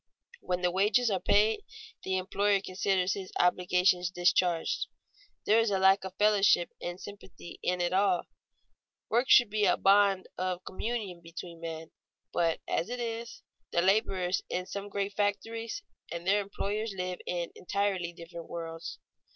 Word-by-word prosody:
When 180 0 -2
the 180 - +3
wages 210 +5 +3
are 190 - +1
paid, 210 - +3 0.4
the 190 0 -1
employer 200 +2 +1
considers 190 0 0
his 190 -2 -6
obligations 180 0 +3
discharged. 175 -1 +1 0.6
There 215 +2 +5
is 225 -1 +2
a 195 - +1
lack 190 +1 +5
of 190 0 -7
fellowship 205 -4 +4
and 175 +1 -5
sympathy 195 -4 -11
in 180 0 0
it 175 +1 0
all. 190 -2 +3 0.9
Work 240 +3 +1
should 240 -5 +7
be 210 -1 +2
a 180 - +3
bond 195 -1 +4
of 185 -1 -2
communion 200 -4 -4
between 170 0 -9
men, 165 -1 -6 0.4
but 165 -2 +1
as 170 - -1
it 245 0 -4
is, 230 0 -5 0.3
the 170 - +1
laborers 190 -2 +2
in 180 0 -2
some 200 +1 -6
great 200 0 -2
factories 225 - -2 0.3
and 170 +1 -5
their 200 +2 +3
employers 205 +1 -3
live 180 0 -3
in 175 -1 -2
entirely 190 -2 -1
different 170 0 -10
worlds. 165 -1 -6
190 Hz, 150 wpm, -30 LUFS, 180-205 Hz, 0.9 s, should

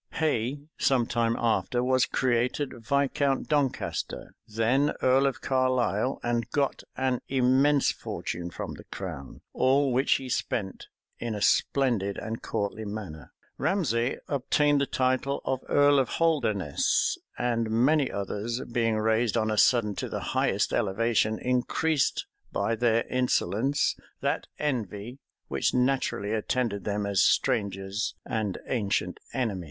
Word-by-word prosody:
Hay, 140 -3 0 0.2
some 130 -3 +3
time 115 -1 0
after, 120 +1 +1
was 130 0 +3
created 125 +3 0
Viscount 140 +3 0
Doncaster, 140 -4 -1
then 120 +7 +1
earl 135 +2 +4
of 130 -1 -3
Carlisle, 130 -2 +1
and 120 -1 -1
got 140 0 0 0.2
an 130 -2 0
immense 135 +2 +3
fortune 85 0 -5
from - - -6
the - - -11
crown, 80 -8 -7
all 135 +1 +3
which 130 +3 +3
he 135 - -2
spent 95 -5 -3 0.3
in 115 -2 -3
a - - -4
splendid 115 -8 +2
and 110 +1 -5
courtly 105 +2 -3
manner. 100 -7 -7 0.3
Ramsay 130 - 0
obtained 145 +1 +2
the 140 - +1
title 130 +2 0
of 130 -1 -1
earl 145 0 +5
of 130 - +1
Holderness; 115 - +1 0.2
and 115 -2 0
many 130 +6 +3
others 105 +4 -3
being 115 -2 +1
raised 110 +1 +1
on 110 -1 +1
a - - +1
sudden 115 -5 +4
to - - -3
the - - -3
highest - - +1
elevation, 110 +2 +1
increased, 135 +4 0 0.3
by 115 - 0
their 115 0 +2
insolence, 130 +1 +1 0.2
that - - -1
envy 120 -3 -3 0.3
which - - 0
naturally 125 -5 0
attended 110 -2 -1
them 105 0 -1
as 100 -2 +2
strangers 100 +1 +1
and 110 -4 -2
ancient 105 -6 -1
enemies. 115 -8 -1
120 Hz, 130 wpm, -27 LUFS, 110-135 Hz, 0.3 s, earl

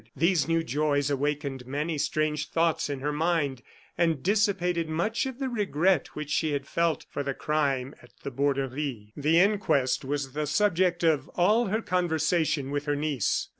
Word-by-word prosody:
These 165 +2 +2
new 165 0 +1
joys 145 -1 0
awakened 140 -2 -2
many 150 +3 -2
strange 150 0 -1
thoughts 165 -2 +1
in 140 -2 -4
her 150 +2 -1
mind, 150 -4 0 0.4
and 165 -5 +1
dissipated 180 -5 +1
much 215 +11 0
of 260 -2 -6
the 270 -1 -2
regret 190 - +1
which 150 -1 -5
she 155 -1 +1
had 140 -1 -2
felt 170 +1 0
for - - -4
the 135 -1 -3
crime 140 -3 -1
at - - -18
the 140 - -4
Borderie. 135 -4 -2
The 150 +3 +2
inquest 190 -11 +2
was 140 0 -3
the 150 0 -2
subject 180 0 +2
of 150 -4 +2
all 210 +6 +3
her 220 +3 -1
conversation 160 -5 0
with 145 0 -2
her 145 -1 0
niece. 145 -7 -1
150 Hz, 170 wpm, -27 LUFS, 140-175 Hz, 0.4 s, all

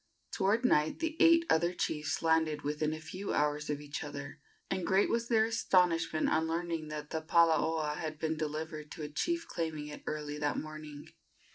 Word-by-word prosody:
Toward 215 +6 +1
night 155 -10 +3
the 325 -1 -2
eight 335 0 +6
other 170 +2 +2
chiefs 155 -3 -2
landed 160 -2 +2
within 150 +1 -1
a 155 - -4
few 185 +5 -5
hours 150 0 0
of 145 -1 -1
each 145 -1 -5
other, 70 - -7 0.3
and 185 - -2
great 190 +3 +3
was 230 0 0
their 220 -2 +4
astonishment 180 -8 +2
on 160 +1 +2
learning 165 -1 -2
that 150 -1 -6
the 160 - -2
palaoa 160 -2 +2
had 155 -1 -4
been 160 +1 -1
delivered 155 0 -4
to 155 - -7
a 150 - -4
chief 335 - -1
claiming 155 -3 -3
it 150 - -8
early 150 -1 -4
that 145 -1 0
morning. 155 -1 -7
160 Hz, 180 wpm, -32 LUFS, 150-175 Hz, 0.3 s, eight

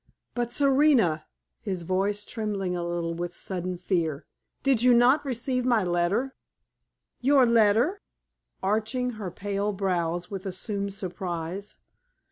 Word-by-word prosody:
"But, 240 -1 -2
Serena" 265 - +3 0.3
his 185 -5 -4
voice 200 +4 0
trembling 200 -5 -2
a 175 - -2
little 170 -1 -2
with 175 +1 -4
sudden 180 -1 -3
fear 170 -5 -1 0.4
"did 270 -5 +3
you 250 0 +6
not 250 +5 +5
receive 255 -1 -1
my 240 -4 +3
letter?" 180 +9 0 0.9
"Your 270 0 +5
letter?" 235 - +3 0.6
arching 220 +5 0
her 190 - -3
pale 200 +3 -2
brows 175 -2 -1
with 195 0 -5
assumed 200 +1 -4
surprise. 185 0 -5
200 Hz, 120 wpm, -27 LUFS, 180-240 Hz, 0.9 s, you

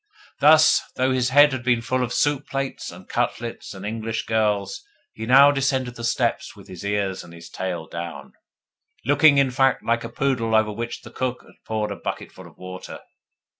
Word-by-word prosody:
Thus, 155 +1 +6
though 130 +1 +1
his 130 -1 +1
head 145 +2 +6
had 130 -2 -3
been 120 -2 +1
full 130 +2 0
of 120 - -3
soup 145 +1 0
plates 135 -1 -4
and - - -13
cutlets 115 -3 -3
and 95 +1 -8
English 115 +1 -3
girls, 105 - 0 0.3
he 110 - -7
now 140 +3 +7
descended 130 -3 -1
the 115 - -8
steps 115 - -1
with - - -15
his 90 -1 -10
ears 100 -2 -2
and 85 -1 -14
his 85 0 -12
tail 90 -3 -4
down 85 -3 -8 0.7
looking, 145 +2 +5
in 135 -2 +3
fact, 135 +1 +2
like 115 0 +1
a 115 - -6
poodle 120 -3 0
over 110 -1 +3
which 115 +3 -6
the - - -12
cook 125 -1 -3
has - - -19
poured 105 -1 -2
a - - -4
bucketful - - -7
of - - -19
water. 95 0 -9
115 Hz, 190 wpm, -23 LUFS, 105-130 Hz, 0.7 s, now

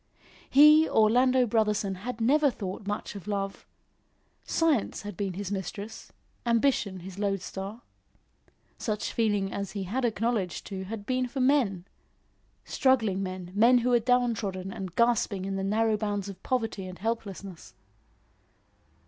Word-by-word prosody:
He, 300 +3 +7
Orlando 250 +4 +4
Brotherson, 210 -4 0
had 235 +5 -6
never 285 +6 +4
thought 200 -4 -6
much 205 +1 -3
of 200 -1 -10
love. 195 -1 -3 0.8
Science 310 -13 0
had 205 -2 -6
been 195 -1 -3
his 200 +1 -5
mistress; 200 +3 -6 0.3
ambition 230 -5 +1
his 190 +2 -9
lode 195 -2 -1
star. 200 +6 -7 1.0
Such 215 -1 -2
feeling 205 -4 0
as 200 -2 -4
he 200 -2 -3
had 235 +8 -2
acknowledged 225 -4 -1
to 190 -2 -5
had 205 +1 -6
been 255 +1 0
for 265 +3 -5
men 255 -10 +2 0.8
struggling 225 -8 +2
men, 185 -2 -5
men 235 +5 +5
who 245 +1 +1
were 240 - +5
down 245 0 +2
trodden 190 -3 -4
and 185 -2 -7
gasping 230 -5 +2
in 195 0 -3
the 195 - -2
narrow 215 +2 +2
bounds 205 -2 -2
of 190 -1 -10
poverty 225 -6 -2
and 185 0 -8
helplessness. 200 -5 -5
210 Hz, 145 wpm, -28 LUFS, 195-240 Hz, 1.0 s, He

